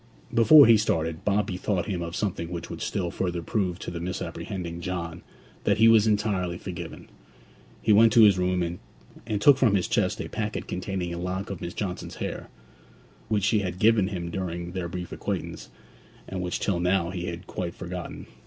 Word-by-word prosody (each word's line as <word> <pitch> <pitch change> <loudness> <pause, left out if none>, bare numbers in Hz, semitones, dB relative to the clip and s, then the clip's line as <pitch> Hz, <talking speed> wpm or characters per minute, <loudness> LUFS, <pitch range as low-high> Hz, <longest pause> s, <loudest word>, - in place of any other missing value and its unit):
Before 140 +6 +8
he 115 -1 +7
started, 80 -6 -1
Bob 105 0 +2
bethought 90 0 -2
him 95 -5 -3
of 85 +1 -5
something 90 -6 -2
which 85 -1 -6
would - - -7
still 90 -4 -2
further 90 -2 -2
prove 90 -2 -1
to - - -6
the 85 - -5
misapprehending 85 0 -5
John 85 -1 -4 0.4
that - - +2
he 110 +1 +6
was 110 -1 +6
entirely 100 -5 0
forgiven. 85 -3 -7 0.8
He 110 - +4
went 110 +2 +6
to 115 - +8
his 100 -3 +6
room, 90 0 +1
and 85 +1 -4 0.6
took 140 +5 +6
from 115 -6 +4
his 95 - +1
chest - - 0
a - - -4
packet - - -4
containing 90 -1 -3
a 85 - -5
lock 95 +3 -3
of 95 - -6
Miss 85 - -5
Johnson's 95 -4 -4
hair, - - -5 0.8
which 105 -3 0
she 110 +1 +3
had 90 -2 -3
given 105 -1 +4
him 85 -4 -4
during 85 -1 -4
their 90 -1 -3
brief 90 -1 -6
acquaintance, - - -4 0.6
and 95 -1 -4
which 90 -1 -2
till 95 -4 0
now 90 -1 +1
he 90 -1 -4
had 85 0 -6
quite 85 -2 -5
forgotten. 90 -1 -6
90 Hz, 190 wpm, -26 LUFS, 85-105 Hz, 0.8 s, Before